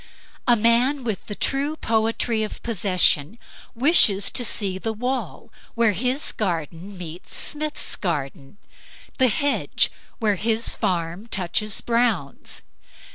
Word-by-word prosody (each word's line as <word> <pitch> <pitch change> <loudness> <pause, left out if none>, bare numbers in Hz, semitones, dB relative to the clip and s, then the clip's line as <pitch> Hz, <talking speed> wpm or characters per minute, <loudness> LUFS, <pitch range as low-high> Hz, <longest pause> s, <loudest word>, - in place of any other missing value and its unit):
A 240 - +6
man 240 +5 +3
with 220 -5 -4
the 205 - -5
true 280 +7 0
poetry 225 -3 0
of 215 - -6
possession 185 -4 +1 0.4
wishes 225 - +5
to 245 - 0
see 195 -4 -1
the 225 +3 -2
wall 250 +4 -4 0.2
where 230 -2 +3
his 250 - -1
garden 180 0 -4
meets 175 +1 -8
Smith's 300 0 -2
garden; 140 -2 -4 0.6
the 260 - +6
hedge 280 +6 +1 0.3
where 210 -4 +1
his 225 +3 +1
farm 175 +3 -2
touches 195 +1 0
Brown's. 230 - -1
220 Hz, 120 wpm, -23 LUFS, 185-240 Hz, 0.6 s, A